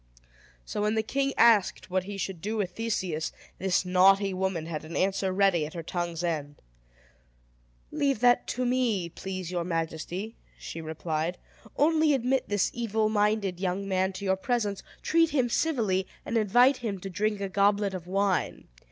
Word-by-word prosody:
So, 205 - -3
when 210 +1 +1
the 220 - +1
king 275 +4 0
asked 220 -6 +4
what 185 0 0
he 200 0 -6
should 190 -3 -4
do 215 +4 -2
with 195 -4 -1
Theseus, 185 -7 -2 0.3
this 185 0 +1
naughty 195 +2 +4
woman 185 -3 -2
had 160 -2 -5
an 155 +1 -8
answer 190 0 +1
ready 190 -4 +3
at 155 +3 -6
her 165 - -5
tongue's 175 0 -3
end. 150 -4 -3 1.3
"Leave 280 -5 0
that 245 0 +4
to 250 +1 -2
me, 240 -8 +1
please 185 0 -6
your 175 -1 -1
majesty," 170 +5 -3 0.2
she 165 - -7
replied. 160 +2 -3 0.4
"Only 310 -1 +4
admit 260 +1 0
this 205 -2 +1
evil 220 -2 0
minded 205 -3 +1
young 190 +1 -2
man 190 0 +1
to 200 +2 -6
your 190 0 +2
presence, 210 -2 -1 0.2
treat 330 0 +3
him 260 -5 +1
civilly, 215 -11 0 0.2
and - - -3
invite 245 +5 +4
him 215 -6 -4
to 195 - -5
drink 210 +2 -1
a 200 - -2
goblet 200 +1 +2
of 180 -2 -6
wine. 195 0 0
195 Hz, 170 wpm, -28 LUFS, 180-225 Hz, 1.3 s, asked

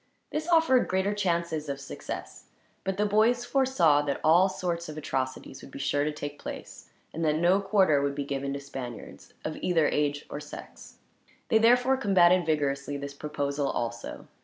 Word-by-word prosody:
This 310 +1 -3
offered 325 -7 +4
greater 190 +2 0
chances 170 -6 -1
of 140 0 -3
success, 140 - -7 0.4
but 190 0 -2
the 210 - +2
boys 225 +4 +3
foresaw 250 - +3
that 140 -2 -2
all 175 +5 +5
sorts 170 -3 -3
of 155 - -7
atrocities 130 -3 -4
would - - -11
be - - -10
sure 140 +1 0
to 155 - 0
take 145 -1 -7
place, - - -8 0.2
and 165 - -3
that 150 -1 +2
no 175 +4 +3
quarter 190 -7 +3
would 140 0 -1
be 140 -1 -3
given 140 0 -3
to 140 - -4
Spaniards 130 -4 -9
of 155 - -3
either 165 -4 +2
age 145 0 -1
or - - -6
sex. 150 - -11 0.5
They 220 - +5
therefore 245 +3 +4
combated 185 - +4
vigorously 145 -2 0
this 140 0 -6
proposal, 140 -1 -2
also. 115 -2 -4
155 Hz, 175 wpm, -28 LUFS, 140-195 Hz, 0.5 s, all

